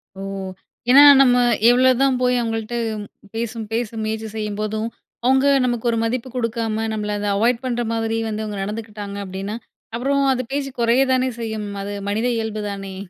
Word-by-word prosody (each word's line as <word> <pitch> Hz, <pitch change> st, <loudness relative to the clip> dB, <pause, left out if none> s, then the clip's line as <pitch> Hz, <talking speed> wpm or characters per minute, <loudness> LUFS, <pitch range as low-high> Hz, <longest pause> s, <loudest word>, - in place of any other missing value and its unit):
ஓ! 195 Hz, -, -8 dB, 0.7 s
ஏன்னா 280 Hz, +3 st, +9 dB, 0.2 s
நம்ம, 250 Hz, -2 st, +5 dB, 0.3 s
எவ்வளோதான் 255 Hz, +1 st, +4 dB
போய் 250 Hz, 0 st, +3 dB
அவங்கள்ட்ட 225 Hz, 0 st, -3 dB, 0.6 s
பேசும் 230 Hz, -1 st, -4 dB
பேசும் 225 Hz, -1 st, -2 dB
முயற்சி 220 Hz, 0 st, -3 dB
செய்யும்போதும், 215 Hz, +1 st, -2 dB, 0.4 s
அவுங்க 265 Hz, +2 st, +4 dB, 0.2 s
நமக்கு 240 Hz, -1 st, 0 dB
ஒரு 230 Hz, -, -1 dB
மதிப்பு 245 Hz, +2 st, -2 dB
குடுக்காம, 225 Hz, -2 st, -1 dB
நம்மளை 210 Hz, -1 st, -2 dB
அதை 205 Hz, 0 st, -1 dB
அவாய்ட் 235 Hz, +4 st, +1 dB
பண்ணுற 240 Hz, -1 st, -1 dB
மாதிரி 225 Hz, 0 st, -1 dB
வந்து 215 Hz, 0 st, -3 dB
அவுங்க 210 Hz, -2 st, -5 dB
நடந்துக்கிட்டாங்க 210 Hz, -1 st, -6 dB
அப்படின்னா, 195 Hz, +4 st, -5 dB, 0.4 s
அப்புறம், 275 Hz, +3 st, +1 dB
அது 255 Hz, -, -1 dB
பேச்சு 275 Hz, -1 st, -2 dB
குறைய 235 Hz, +3 st, +4 dB
தானே 255 Hz, 0 st, +2 dB
செய்யும்! 220 Hz, -2 st, -4 dB
அது 205 Hz, +1 st, -5 dB, 0.2 s
மனித 220 Hz, +4 st, 0 dB
இயல்பு 220 Hz, -1 st, -3 dB
தானே? 195 Hz, -1 st, -7 dB
225 Hz, 155 wpm, -21 LUFS, 215-245 Hz, 0.7 s, ஏன்னா